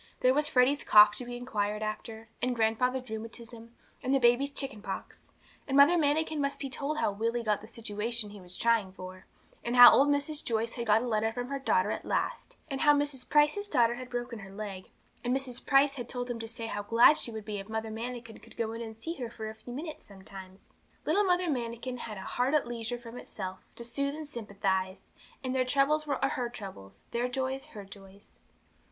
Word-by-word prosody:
There 255 0 +5
was 295 +2 +2
Freddy's 265 +1 +3
cough 210 0 +8
to 250 - -2
be 245 0 -6
inquired 210 -4 -2
after, 220 +1 -5
and 250 0 0
grandfather's 250 +3 +1
rheumatism, 230 +1 -8 0.3
and 265 +1 +1
the - - +4
baby's 245 +3 +4
chickenpox. 270 -7 -6 0.4
And 270 0 +1
Mother 285 +5 +7
Manikin 310 -1 +1
must 280 0 -1
be 275 -2 -5
told 290 +3 -3
how 305 - +1
Willie 230 +4 -1
had - - -11
got 210 -1 +1
that 215 - -11
situation 225 0 -3
he 205 -1 -11
was 180 0 -5
trying 225 -5 +2
for, 185 0 -10 0.4
and 240 +1 -1
how 245 -1 +12
old 275 - +5
Mrs. 290 +1 0
Joyce 230 0 0
had 235 -1 -5
got 215 +2 +4
a - - -3
letter 220 -1 +1
from 245 +2 -5
her 275 0 -3
daughter 270 - +2
at - - -4
last; - - -2
and 270 -3 -4
how 295 -1 +6
Mrs. 285 -3 -2
Price's 300 +8 +3
daughter 235 - +3
had 250 +1 -8
broken 240 -1 -4
her 195 -1 -10
leg, 195 -2 -7 0.3
and 250 +2 +1
Mrs. 255 -3 -3
Price 275 0 +4
had 245 -4 -7
told 245 0 -4
them 240 -1 -3
to 225 - -5
say 230 0 -5
how 205 -2 -3
glad 230 +8 +6
she - - -1
would 220 -2 -7
be 210 -2 -4
if 195 +2 -9
Mother 220 0 -3
Manikin 230 0 -6
could - - -17
go 225 -1 -1
in 230 +1 -6
to 220 -1 -7
see 325 +8 -3
her 245 -3 -4
for 220 -2 -6
a - - -10
few 220 +2 -11
minutes 305 +5 -6
sometimes. 190 -1 -12 0.3
Little 410 0 +3
Mother 360 -1 +2
Manikin 245 -2 -3
had 215 -3 -6
'a - - -6
heart 250 +8 0
at 300 - +2
leisure 240 0 -4
from 240 0 -10
itself, 190 -5 -6 0.2
to 235 - -6
soothe 280 +4 -2
and 310 -1 -7
sympathise,' 195 -6 -3 0.3
and 260 0 -2
their 260 - +3
troubles 280 +4 +2
were 285 - 0
her 250 -3 0
troubles, 190 - -10
their 240 +1 0
joys 265 +1 -2
her 205 -3 -10
joys. 195 0 -15
240 Hz, 220 wpm, -30 LUFS, 215-270 Hz, 0.4 s, how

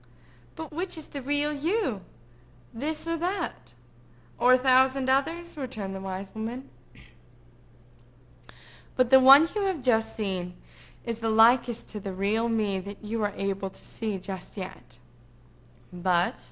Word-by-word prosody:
"But 320 -1 -8
which 355 +2 -3
is 315 - -8
the 280 - -6
real 290 +3 0
you?" 300 - -1 0.7
asked 225 - -8
Rosamond; 295 - -1
"this 315 +1 -5
or 330 0 -1
that?" 340 - -4 0.7
"Or 250 +1 +6
a - - +7
thousand 260 +1 +3
others?" 330 +6 -1
returned 220 -8 -5
the 190 - -5
wise 190 0 -6
woman. 230 +4 -6 2.2
"But 255 -1 +2
the 265 - +9
one 275 +5 +9
you 420 - -1
have 365 -9 -2
just 225 -3 +1
seen 185 -4 -3 0.5
is 230 -2 -4
the 225 0 -1
likest 230 +2 +4
to 210 - -6
the 195 -1 -6
real 215 +4 0
me 210 -4 0
that 200 +3 -9
you 220 +1 -3
are 205 -1 -1
able 195 0 -2
to - - -14
see 215 -3 -4
just 190 +1 -8
yet—but—. 125 +1 -5
225 Hz, 150 wpm, -27 LUFS, 190-270 Hz, 2.2 s, the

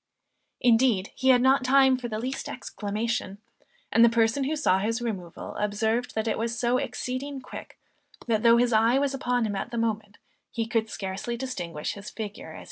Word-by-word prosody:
Indeed 230 -5 +3
he 260 - 0
had 250 -1 +6
not 265 0 +4
time 265 0 +5
for 250 -1 -5
the 215 -2 -4
least 255 +4 -4
exclamation; 210 -1 -3 0.5
and 230 - +5
the 235 - +7
person 230 +4 +2
who 305 +3 -1
saw 190 -11 +2
his 225 +4 -1
removal, 195 -8 -5
observed 220 +4 -1
that 220 +1 -1
it 220 - 0
was 230 +1 -2
so 245 +1 +2
exceeding 260 +2 -4
quick - - -10 0.5
that 220 -3 +1
though 235 0 +6
his 240 0 +2
eye 225 +4 +4
was 280 0 +1
upon 245 -3 0
him 205 -2 -2
at 195 - -3
the 235 - -5
moment, 215 -2 -2 0.3
he 230 -1 -2
could 225 -1 -1
scarcely 195 +5 -4
distinguish 175 - -4
his 200 0 -9
figure 210 -2 -7
as - - -10
he - - -10
disappeared. - - -9
230 Hz, 200 wpm, -26 LUFS, 215-250 Hz, 0.5 s, the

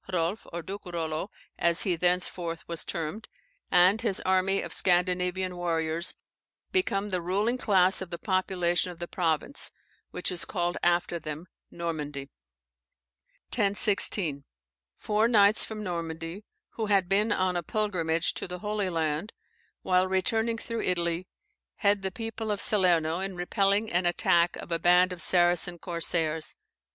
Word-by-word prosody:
Hrolf 180 +3 -1
(or 170 0 -5
Duke 195 +3 -7
Rollo, 165 +1 -3 0.3
as 170 0 +3
he 185 -3 +1
thenceforth 175 -1 -1
was 170 -1 0
termed) 170 +7 -5 0.4
and 185 +4 +5
his 195 - +1
army 190 +1 +2
of - - -7
Scandinavian 180 0 +1
warriors, 170 -1 -1 0.6
become 210 - 0
the 185 -3 -1
ruling 205 +8 0
class 190 -5 +3
of 190 - -6
the 170 - -5
population 185 -2 0
of 175 - -12
the 175 +1 -5
province, 165 - -1 0.4
which - - -2
is 180 - 0
called 175 -1 -2
after 175 0 +1
them 155 +1 -6 0.2
Normandy. 150 -5 -5 1.2
1016. 200 - +1 0.5
Four 215 +1 +1
knights 210 -2 +5
from 215 -1 -5
Normandy, 170 +1 -5 0.2
who 220 -2 -4
had 195 -3 +3
been 205 +4 +2
on 185 -2 +1
a 175 - 0
pilgrimage 170 -4 0
to - - -5
the 180 0 -5
Holy 210 0 -2
Land, 160 +3 -2 0.5
while 185 0 +3
returning 220 +5 0
through 230 0 -4
Italy, 170 0 0 0.5
head 205 -1 +2
the 190 - -2
people 225 +2 -5
of 205 -1 -1
Salerno 175 -6 +3
in 190 0 -4
repelling 200 +4 +2
an 175 +1 +2
attack 175 0 +2
of - - -9
a 165 - 0
band 180 +1 +4
of 175 - -8
Saracen 175 0 +3
corsairs. 165 -2 0
180 Hz, 145 wpm, -28 LUFS, 170-200 Hz, 1.2 s, and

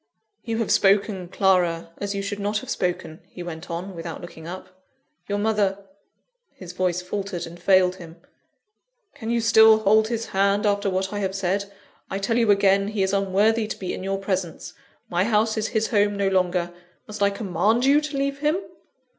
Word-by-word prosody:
"You 225 -2 -3
have 225 -2 -1
spoken, 195 -2 +2
Clara, 175 -3 +1
as 200 0 -3
you 200 - -2
should 200 +1 -4
not 205 +1 -1
have - - -5
spoken," 175 -3 -3
he 180 - -8
went 170 0 -8
on, 175 +3 -5
without 165 -1 -6
looking 165 -2 -10
up. 185 +1 -10 0.5
"Your 205 - -1
mother 205 -2 +1 0.4
" - - -52
his 180 -2 -7
voice 180 -1 -1
faltered 190 -1 -4
and 170 +1 -12
failed 185 0 +4
him. 165 -2 -11 1.0
"Can 225 - -7
you 235 0 +1
still 220 -1 +6
hold 220 +1 +3
his 230 -1 -3
hand 200 +2 +1
after 200 -1 +1
what 190 +1 -2
I 205 - -2
have 190 -1 -2
said? 195 +1 -1 0.4
I 195 - -3
tell 225 +4 0
you 230 -2 +2
again, 195 0 +4
he 210 -2 -1
is 190 +1 -1
unworthy 205 +3 +2
to - - -5
be 185 - -4
in - - -6
your 195 +1 -2
presence; 185 -3 -4 0.3
my 175 +1 +1
house 220 +1 +1
is 220 -1 -1
his 220 0 -1
home 205 -2 +2
no 200 -1 +1
longer 180 -2 0 0.3
must 210 -1 -9
I 200 - +5
command 205 +4 0
you 285 +2 +5
to 300 -2 -4
leave 275 0 -1
him?" 300 +3 +1
200 Hz, 195 wpm, -24 LUFS, 185-215 Hz, 1.0 s, still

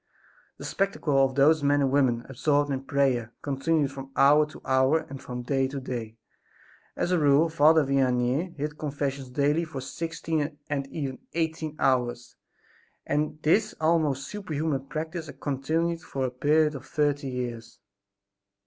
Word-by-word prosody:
The - - -8
spectacle 155 -8 +1
of 130 -1 0
those 150 +3 +5
men 145 0 +3
and 135 -2 +2
women 125 -4 +2
absorbed 145 +2 +1
in 135 0 -3
prayer 130 -5 +1
continued 145 +1 0
from 135 -1 -8
hour 150 +2 +5
to 150 - -12
hour 130 +4 +3
and 135 -1 -8
from 125 0 -6
day 135 +1 +1
to 135 +1 -5
day. 115 -4 -6 0.8
As 175 - -1
a 180 - +3
rule 145 +2 +4
Father 160 0 +5
Vianney 135 +5 +1
heard 150 +1 -4
confessions 140 -3 -3
daily 145 +5 +1
for 155 -5 -6
sixteen 155 +1 -3
and 140 -1 -1
even 135 -3 -5
eighteen 160 -2 -2
hours 120 -2 0 0.7
and 150 +1 -1
this 205 +8 +2
almost 155 -4 +1
superhuman 155 -8 -3
practice 160 +1 -5
continued 160 +5 -1
for 135 -3 -3
a 125 - -2
period 150 +4 +2
of 135 -1 -9
thirty 145 -2 0
years. 120 -2 -5
145 Hz, 150 wpm, -27 LUFS, 135-155 Hz, 0.8 s, those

